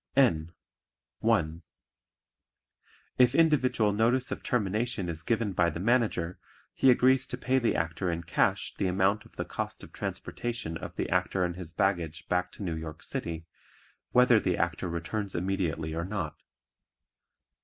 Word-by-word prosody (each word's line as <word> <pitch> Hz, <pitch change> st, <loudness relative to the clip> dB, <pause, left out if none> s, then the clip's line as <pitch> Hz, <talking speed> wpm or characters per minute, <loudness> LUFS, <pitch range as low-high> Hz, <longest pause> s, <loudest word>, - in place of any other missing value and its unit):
(N) 85 Hz, -12 st, +3 dB, 0.7 s
(1) 85 Hz, -8 st, +1 dB, 1.6 s
If 125 Hz, +1 st, +5 dB
individual 130 Hz, -9 st, +3 dB
notice 120 Hz, +5 st, +2 dB
of -, -, -3 dB
termination 110 Hz, -2 st, -1 dB
is 80 Hz, -2 st, -4 dB
given 110 Hz, +3 st, 0 dB
by 85 Hz, -1 st, +3 dB
the 85 Hz, -, -5 dB
Manager 105 Hz, -5 st, +1 dB, 0.3 s
he 135 Hz, -, +4 dB
agrees 130 Hz, +1 st, +5 dB
to 125 Hz, -, -4 dB
pay 130 Hz, +1 st, +2 dB
the 120 Hz, -, +1 dB
Actor 80 Hz, +3 st, -1 dB
in 85 Hz, 0 st, -3 dB
cash 80 Hz, -, +1 dB
the 95 Hz, -, -1 dB
amount 95 Hz, +3 st, +1 dB
of -, -, -19 dB
the -, -, -3 dB
cost -, -, -5 dB
of -, -, -12 dB
transportation 115 Hz, -9 st, -4 dB
of -, -, -7 dB
the -, -, -2 dB
Actor 95 Hz, -, +1 dB
and 85 Hz, -1 st, -1 dB
his 90 Hz, -3 st, -7 dB
baggage 85 Hz, -5 st, -1 dB
back 90 Hz, 0 st, 0 dB
to -, -, -7 dB
New 85 Hz, -4 st, -2 dB
York 80 Hz, 0 st, -7 dB
City 80 Hz, -1 st, -4 dB, 0.7 s
whether 125 Hz, -2 st, +6 dB
the 90 Hz, -4 st, 0 dB
Actor 85 Hz, +1 st, -1 dB
returns 95 Hz, +4 st, -3 dB
immediately 85 Hz, -4 st, -1 dB
or 85 Hz, +1 st, -2 dB
not. 95 Hz, -6 st, -3 dB
95 Hz, 155 wpm, -29 LUFS, 85-115 Hz, 1.6 s, whether